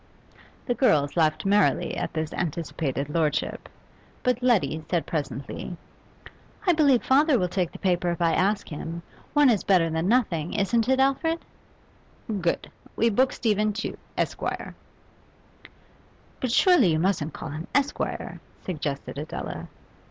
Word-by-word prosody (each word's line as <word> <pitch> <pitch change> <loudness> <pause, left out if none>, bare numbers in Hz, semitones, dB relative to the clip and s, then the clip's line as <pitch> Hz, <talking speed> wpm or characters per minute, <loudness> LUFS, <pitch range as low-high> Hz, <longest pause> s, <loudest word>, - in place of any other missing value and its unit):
The 245 - +1
girls 150 - +2
laughed 155 -1 +2
merrily 195 -3 +2
at - - -3
this 155 -1 -3
anticipated 155 -4 -2
lordship; 150 -1 -1 0.5
but 250 -1 +1
Letty 175 - +2
said 175 -3 0
presently 150 +3 -4 0.9
'I 360 - +5
believe 285 -6 +4
father 280 +1 +4
will 180 - +1
take 180 -1 -1
the - - -9
paper 180 -2 +1
if 170 - -2
I 170 -1 +2
ask 200 +2 +1
him. 165 +2 -6 0.3
One 295 -1 +5
is 225 -6 +3
better 175 -4 +3
than 160 +2 -1
nothing, 190 -9 +1
isn't 225 +4 +1
it, 265 0 +3
Alfred?' 315 +5 +1 1.0
'Good. 170 0 -1 0.2
We 230 +1 +2
book 255 +5 +3
Stephen 215 -2 +1
Tew, 215 - -4 0.2
Esquire.' - - -2 1.7
'But 255 - -1
surely 350 - +5
you - - +2
mustn't 165 -3 0
call 155 - -6
him 155 +3 -6
Esquire?' 285 0 -1 0.2
suggested 145 -5 -4
Adela. 155 - -6
185 Hz, 135 wpm, -26 LUFS, 160-245 Hz, 1.7 s, I